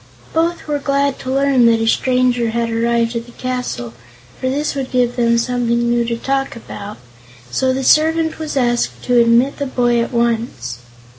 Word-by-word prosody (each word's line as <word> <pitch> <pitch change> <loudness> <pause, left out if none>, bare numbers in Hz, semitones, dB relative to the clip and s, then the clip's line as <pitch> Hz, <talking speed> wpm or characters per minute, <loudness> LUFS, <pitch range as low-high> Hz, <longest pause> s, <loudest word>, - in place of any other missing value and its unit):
Both 335 +2 0
were 295 -1 -1
glad 280 0 0
to 260 - -5
learn 270 -3 +3
that 230 -1 +4
a 225 - 0
stranger 250 0 +2
had 230 0 -1
arrived 230 +1 0
at 230 +1 -4
the - - -13
castle, 250 - -4 0.5
for 260 - -1
this 290 +3 -1
would 270 -2 -4
give 245 -2 +1
them 235 -1 +2
something 235 0 0
new 235 0 +1
to 235 0 -2
talk 270 +2 -2
about, 210 -2 -9 0.5
so 260 - +1
the 265 +1 -2
servant 320 +3 +3
was 310 -3 -4
asked 240 -2 0
to 245 -1 +4
admit 235 +4 +3
the 285 - -2
boy 240 -2 +1
at 235 - -3
once. 230 - -1
245 Hz, 180 wpm, -18 LUFS, 235-270 Hz, 0.5 s, that